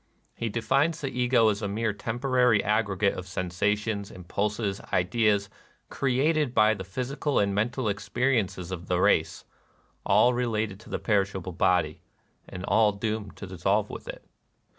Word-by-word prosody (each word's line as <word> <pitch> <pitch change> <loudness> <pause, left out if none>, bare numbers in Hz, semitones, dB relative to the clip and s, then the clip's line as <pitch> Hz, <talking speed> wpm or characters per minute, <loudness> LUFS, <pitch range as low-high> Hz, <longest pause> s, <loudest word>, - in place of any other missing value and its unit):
He 115 - -3
defines 140 +9 +1
the 140 -4 -3
Ego 125 -2 +3
as 105 0 -1
a 105 - -1
mere 110 +2 -1
temporary 120 0 +1
ag 105 +1 +1
gregate 100 0 +1
of 90 - -7
sensations, 100 +3 -1
impulses, 100 +2 -3
ideas, 100 +2 +2 0.4
created 140 +1 +1
by 110 0 +5
the 95 -3 -6
physical 130 +8 -2
and 100 -1 +2
mental 120 +4 -1
experiences 105 -3 -1
of 90 -1 -6
the 90 -1 +1
race, - - +2 0.3
— - - -36 0.2
all 125 - +4
related 110 -5 -1
to 115 - -15
the - - -2
perishable 95 -3 -1
body, 80 -2 +1 0.5
and 90 +1 -6
all 110 -2 +3
doomed 105 -1 -4
to - - -8
dissolve 95 +3 0
with - - -9
it. - - -8
105 Hz, 155 wpm, -27 LUFS, 100-120 Hz, 0.5 s, by